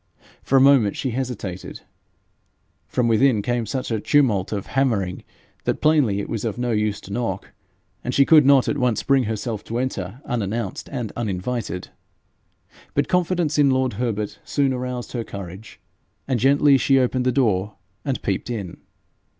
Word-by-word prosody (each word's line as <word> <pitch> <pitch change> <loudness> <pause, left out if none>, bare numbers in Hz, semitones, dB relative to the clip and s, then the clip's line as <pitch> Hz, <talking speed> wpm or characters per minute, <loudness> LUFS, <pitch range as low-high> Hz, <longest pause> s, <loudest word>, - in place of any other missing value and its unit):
For 135 - +2
a - - +6
moment 135 -7 +5
she 130 - -2
hesitated: 115 -8 -5 1.1
from 125 -2 0
within 115 -1 +3
came 120 -1 -1
such 130 -3 -3
a 110 - 0
tumult 105 -7 +2
of 100 -2 -3
hammering, 110 -10 0 0.4
that - - 0
plainly 145 -10 +3
it 100 - -4
was 110 -3 -3
of 115 -1 -2
no 125 0 -1
use 105 -2 0
to 100 - -9
knock, 100 -5 -3 0.5
and 125 - -2
she 140 +2 +4
could 155 0 +7
not 135 -1 +5
at 145 - 0
once 125 -4 +1
bring 135 -3 +3
herself 110 0 -3
to 115 - -3
enter 120 -4 -3
unannounced 110 -3 -3
and 120 -6 -4
uninvited. 105 -2 -3 1.1
But - - +1
confidence 175 -4 +1
in 140 -1 +5
lord 130 -2 +1
Herbert 105 -2 -3
soon 140 -2 +1
aroused 125 -1 -4
her 120 -2 -3
courage, 100 0 -9 0.5
and 130 -3 0
gently 140 +2 +5
she 135 +2 +3
opened 130 0 +1
the - - +4
door 105 -6 +1 0.3
and 135 -3 -3
peeped 100 +4 -2
in. 100 -7 -5
120 Hz, 165 wpm, -22 LUFS, 105-135 Hz, 1.1 s, could